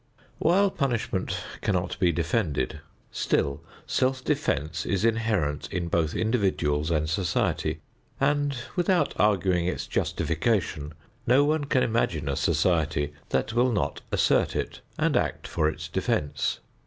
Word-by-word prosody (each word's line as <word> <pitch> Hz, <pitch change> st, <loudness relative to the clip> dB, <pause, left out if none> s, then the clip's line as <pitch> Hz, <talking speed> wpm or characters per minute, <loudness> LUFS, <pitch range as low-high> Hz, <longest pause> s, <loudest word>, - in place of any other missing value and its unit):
While 195 Hz, +4 st, +4 dB
punishment 115 Hz, -, -1 dB, 0.2 s
cannot 90 Hz, -4 st, -1 dB
be 90 Hz, -2 st, +4 dB
defended, 80 Hz, -, -1 dB, 0.3 s
still 70 Hz, +1 st, 0 dB, 0.2 s
self 130 Hz, 0 st, 0 dB
defense 85 Hz, -, -1 dB
is 100 Hz, +2 st, 0 dB
inherent 110 Hz, -10 st, 0 dB
in 85 Hz, -1 st, -2 dB
both 80 Hz, -2 st, +1 dB
individuals 95 Hz, -10 st, +1 dB
and 75 Hz, -2 st, +1 dB
society 90 Hz, +2 st, 0 dB, 0.4 s
and, 145 Hz, 0 st, +1 dB, 0.2 s
without 180 Hz, 0 st, +2 dB
arguing 95 Hz, -4 st, +2 dB
its 90 Hz, -, -2 dB
justification, 80 Hz, -4 st, -1 dB, 0.3 s
no 130 Hz, +4 st, +5 dB
one 150 Hz, 0 st, +1 dB
can 130 Hz, -2 st, +2 dB
imagine 90 Hz, -10 st, 0 dB
a 70 Hz, -, 0 dB
society 75 Hz, -4 st, +1 dB, 0.2 s
that 110 Hz, -, 0 dB
will 125 Hz, +2 st, +3 dB
not 105 Hz, -, -1 dB
assert -, -, +2 dB
it -, -, -3 dB, 0.2 s
and -, -, +1 dB
act -, -, 0 dB
for 75 Hz, -, +1 dB
its -, -, -6 dB
defense. 70 Hz, -1 st, -1 dB
95 Hz, 130 wpm, -26 LUFS, 80-125 Hz, 0.4 s, no